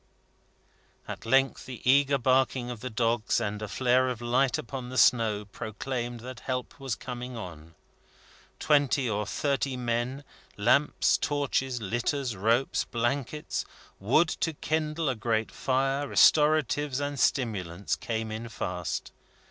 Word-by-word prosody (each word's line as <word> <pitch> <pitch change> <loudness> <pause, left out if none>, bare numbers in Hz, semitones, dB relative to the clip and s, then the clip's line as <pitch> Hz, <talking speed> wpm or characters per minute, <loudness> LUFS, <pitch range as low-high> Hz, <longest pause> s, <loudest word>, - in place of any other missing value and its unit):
At - - -7
length 135 +2 +2
the 130 -3 -7
eager 140 +1 +5
barking 130 -1 +1
of 120 - -7
the 130 - -5
dogs, 115 0 +1
and 105 -2 -3
a 105 - -3
flare 130 +2 +2
of 125 -3 -4
light 125 +2 +2
upon 125 0 -6
the 130 - -5
snow, 110 -5 +4
proclaimed 120 +4 -5
that 125 0 -8
help 125 0 -4
was 135 -4 -2
coming 125 -1 -6
on. 85 -5 -9 0.8
Twenty 145 -3 +2
or 105 -2 -1
thirty 140 +2 -1
men, 120 +3 -2 0.3
lamps, 125 +8 +3
torches, 135 -3 -1
litters, 120 +4 -1
ropes, 115 +7 +1
blankets, 125 +5 -2 0.4
wood 135 - +3
to 165 - -1
kindle 155 +1 -1
a 130 - +2
great 110 -1 -1
fire, 135 +2 0
restoratives 150 -2 +4
and 145 -1 -3
stimulants, 100 -9 0
came 110 -1 -3
in 115 +2 -5
fast. 90 -7 -4
125 Hz, 130 wpm, -28 LUFS, 115-135 Hz, 0.8 s, eager